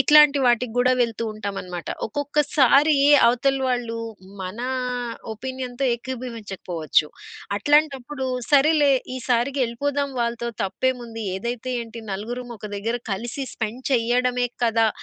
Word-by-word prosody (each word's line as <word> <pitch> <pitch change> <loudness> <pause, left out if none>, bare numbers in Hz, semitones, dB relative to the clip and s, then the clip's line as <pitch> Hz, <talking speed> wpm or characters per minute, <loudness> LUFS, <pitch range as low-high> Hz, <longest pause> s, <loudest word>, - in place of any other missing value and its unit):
ఇట్లాంటి 295 0 +7
వాటికి 240 -1 +2
గూడా 250 +1 +4
వెళ్తూ 230 -1 -2
ఉంటామనమాట. 195 -5 -5 0.2
ఒక్కొక్కసారీ 290 +2 +3 0.3
అవతల 270 +3 +2
వాళ్ళూ 240 -2 -1 0.4
మనా 215 +7 -4 0.7
ఒపీనియన్‌తో 260 +2 -4
ఏకీభవించకపోవచ్చు. 210 - -2 0.5
అట్లాంటప్పుడు, 280 0 +1 0.2
సరేలే 290 0 +5 0.2
ఈ - - -3
సారికి 250 +3 +1
యెళ్ళిపోదాం 280 +4 -2
వాళ్ళతో, 235 0 -1
తప్పేముంది, 230 +2 -2
ఏదైతే 240 +4 -4
ఏంటి, 230 0 -8
నలుగురుమొక 235 +2 -6
దగ్గర 225 +4 -1 0.2
కలిసి 235 +7 -4
స్పెండ్ 230 +3 -4
చెయ్యడమే 245 +1 +2 0.2
కదా! 225 -1 +3
245 Hz, 105 wpm, -23 LUFS, 230-270 Hz, 0.7 s, ఇట్లాంటి